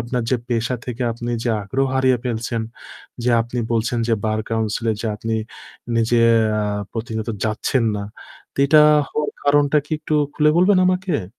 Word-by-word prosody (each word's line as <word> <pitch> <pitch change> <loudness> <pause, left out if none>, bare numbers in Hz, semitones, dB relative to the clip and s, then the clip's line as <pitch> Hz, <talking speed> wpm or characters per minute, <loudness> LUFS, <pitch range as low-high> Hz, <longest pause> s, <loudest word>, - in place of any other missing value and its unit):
আপনার 120 +1 -2
যে 130 - +3
পেশা 120 +1 0
থেকে 125 +1 -4
আপনি 120 +1 -5
যে 120 - +1
আগ্রহ 135 +7 -1
হারিয়ে 130 -1 +3
ফেলছেন, 115 -1 -2 0.6
যে 125 - +2
আপনি 120 +2 -6
বলছেন 115 +1 0
যে 115 - +3
বার 110 0 0
কাউন্সিল 110 0 -1
এ - - -3
যে - - -2
আপনি 115 +1 -3 0.6
নিজে 115 +1 +2 0.4
আ - - 0 0.3
প্রতিনিয়ত 110 -1 -4 0.2
যাচ্ছেন 115 +3 0
না। 100 - -4 0.5
তো - - -17
এটা 150 +1 +6 0.3
হওয়ার 150 -1 -2
কারণটা 145 +1 +4
কি - - -25
একটু 155 0 -3 0.2
খুলে 150 0 +3
বলবেন 185 +1 +4
আমাকে? 180 - 0
120 Hz, 170 wpm, -20 LUFS, 115-140 Hz, 0.6 s, এটা